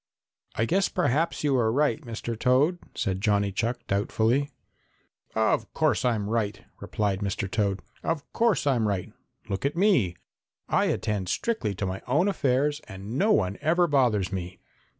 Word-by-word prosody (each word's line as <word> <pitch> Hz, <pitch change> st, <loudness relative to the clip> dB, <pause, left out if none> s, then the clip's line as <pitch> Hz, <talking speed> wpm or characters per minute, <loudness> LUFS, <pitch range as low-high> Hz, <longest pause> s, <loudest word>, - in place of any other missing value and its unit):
"I 115 Hz, -, +1 dB
guess 190 Hz, +9 st, +2 dB
perhaps 165 Hz, -1 st, 0 dB
you 145 Hz, -2 st, +2 dB
are 110 Hz, -2 st, +2 dB
right, 150 Hz, +4 st, +1 dB
Mr. 115 Hz, -2 st, -5 dB
Toad," 135 Hz, +10 st, +2 dB, 0.2 s
said 95 Hz, -3 st, -1 dB
Johnny 100 Hz, -2 st, +2 dB
Chuck 115 Hz, +5 st, -2 dB
doubtfully. 115 Hz, +7 st, +1 dB, 0.9 s
"Of 110 Hz, 0 st, +1 dB
course 155 Hz, -3 st, +2 dB
I'm 115 Hz, -5 st, +1 dB
right," 105 Hz, -3 st, -1 dB, 0.2 s
replied 100 Hz, -3 st, -1 dB
Mr. 100 Hz, 0 st, -2 dB
Toad. 100 Hz, -2 st, -1 dB, 0.2 s
"Of 165 Hz, -3 st, -2 dB
course 230 Hz, -9 st, +2 dB
I'm 125 Hz, -6 st, +2 dB
right. 100 Hz, -3 st, -2 dB, 0.3 s
Look 95 Hz, -1 st, -3 dB
at 140 Hz, +3 st, 0 dB
me; 175 Hz, -, +3 dB, 0.5 s
I -, -, +2 dB
attend 100 Hz, -4 st, -1 dB
strictly 120 Hz, -, -1 dB
to 100 Hz, -, -2 dB
my 95 Hz, +1 st, -4 dB
own 150 Hz, +10 st, +2 dB
affairs 145 Hz, -4 st, +1 dB
and 100 Hz, +4 st, -7 dB
no 205 Hz, +10 st, +3 dB
one 95 Hz, -, +1 dB
ever 170 Hz, +4 st, +3 dB
bothers 125 Hz, -, +2 dB
me." 90 Hz, -1 st, -5 dB
115 Hz, 155 wpm, -26 LUFS, 100-145 Hz, 0.9 s, me